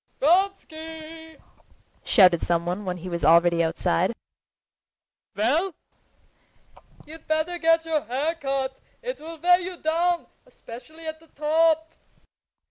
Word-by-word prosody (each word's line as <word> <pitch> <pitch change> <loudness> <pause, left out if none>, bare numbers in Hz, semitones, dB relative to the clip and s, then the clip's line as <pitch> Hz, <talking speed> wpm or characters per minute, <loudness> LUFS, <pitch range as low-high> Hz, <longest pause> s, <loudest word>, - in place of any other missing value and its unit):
"Vronsky!" 320 -2 -1 0.7
shouted 180 -6 +5
someone 175 +4 -1
when 180 -1 -3
he 180 +1 -8
was 170 -2 -4
already 170 +2 +5
outside. 160 - 0 1.2
"Well?" 300 - +1 1.3
"You'd 315 +1 -13
better 315 +3 -1
get 330 0 +3
your 315 -2 0
hair 275 +8 -1
cut, 270 -4 -3 0.2
it'll 330 -10 -6
weigh 355 +3 +4
you 365 0 -6
down, 340 +2 0 0.2
especially 315 +8 -12
at 315 0 -5
the 325 - -21
top." 320 +2 +1
315 Hz, 110 wpm, -25 LUFS, 230-330 Hz, 1.3 s, shouted